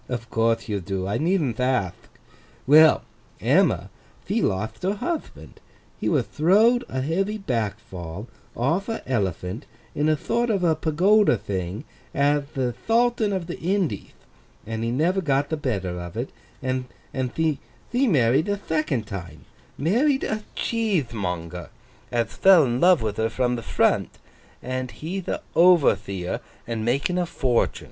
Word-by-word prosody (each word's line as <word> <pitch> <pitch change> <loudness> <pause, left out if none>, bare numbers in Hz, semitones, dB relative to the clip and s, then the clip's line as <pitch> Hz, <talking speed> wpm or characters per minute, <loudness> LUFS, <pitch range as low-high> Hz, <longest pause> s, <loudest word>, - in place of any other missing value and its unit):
Of 120 -2 -5
courthe 115 +1 +1
you 105 -3 -1
do; 95 0 -3
I 100 - -1
needn't 155 - +1
athk. 125 -8 +1 0.7
Well! 155 +3 +7 0.4
Emma, - - +2 0.3
thee - - 0
lotht 110 +4 -2
her 195 +3 0
huthband. 335 +9 -5 0.4
He - - 0
wath - - +2
throw'd 215 +10 +3
a 130 - -2
heavy 195 +9 -1
back 115 - -2
fall 90 +3 -8 0.3
off 165 - 0
a 225 - -4
Elephant 100 - -2 0.3
in 150 +2 +1
a 155 - +4
thort 235 +9 -1
of 200 -4 +1
a 165 -2 +3
Pagoda 185 +8 +3
thing 95 +4 -4 0.3
ath 145 +1 +1
the 125 -3 0
Thultan 230 - +1
of 190 -3 -2
the 175 - -6
Indieth, 180 - -2 0.5
and 115 +1 -4
he 115 - 0
never 165 +10 +1
got 140 -3 +1
the 160 - 0
better 95 - -3
of 85 +4 -7
it; 120 +3 -3 0.3
and 130 -1 -1 0.5
thee 160 -2 +1 0.3
married 160 - +3
a 205 - 0
thecond 155 - -1
time—married 155 - -2
a 215 0 -2
Cheethemonger 105 - -2 0.4
ath 115 -2 -1
fell 185 -6 +7
in 120 0 -1
love 175 -6 +5
with 105 -2 -2
her 110 0 +1
from 125 +2 0
the 115 - -4
front—and 130 +2 -2
he'th 180 +7 -6
a - - -3
Overtheer 105 - +3 0.3
and 115 -2 -3
makin' 140 +10 0
a 175 - 0
fortun. 130 -7 0
135 Hz, 145 wpm, -24 LUFS, 110-180 Hz, 0.7 s, Well